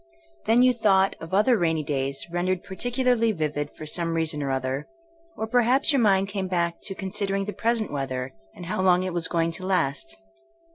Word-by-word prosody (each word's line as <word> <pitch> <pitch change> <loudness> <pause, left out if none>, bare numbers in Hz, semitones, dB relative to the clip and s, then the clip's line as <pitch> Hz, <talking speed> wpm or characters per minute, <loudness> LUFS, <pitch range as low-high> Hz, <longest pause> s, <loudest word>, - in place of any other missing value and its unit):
Then 235 +3 +5
you 255 0 +5
'Hhought'* 195 -4 +3
of 165 - -8
other 215 +6 +4
rainy 160 -3 +1
days 135 -1 -2
rendered 180 +1 -1
particularly 245 +2 0
vivid 150 -3 -2
for 155 - -10
some 165 +1 -1
reason 160 -2 0
or 140 - -2
other, 130 +1 -2 0.5
or 220 - -2
perhaps 245 +5 +3
your 275 - +3
mind 195 -3 +3
came 195 -1 -3
back 170 -2 -1
to 195 - -3
considering 195 0 -1
the 210 - -5
present 230 -2 0
weather, 130 -2 -3 0.2
and 175 - -9
how 185 - -2
long 180 -1 +4
it 185 -1 -3
was 170 -1 0
going 165 0 0
to 185 +3 -4
last. 185 - 0
185 Hz, 190 wpm, -25 LUFS, 160-215 Hz, 0.5 s, Then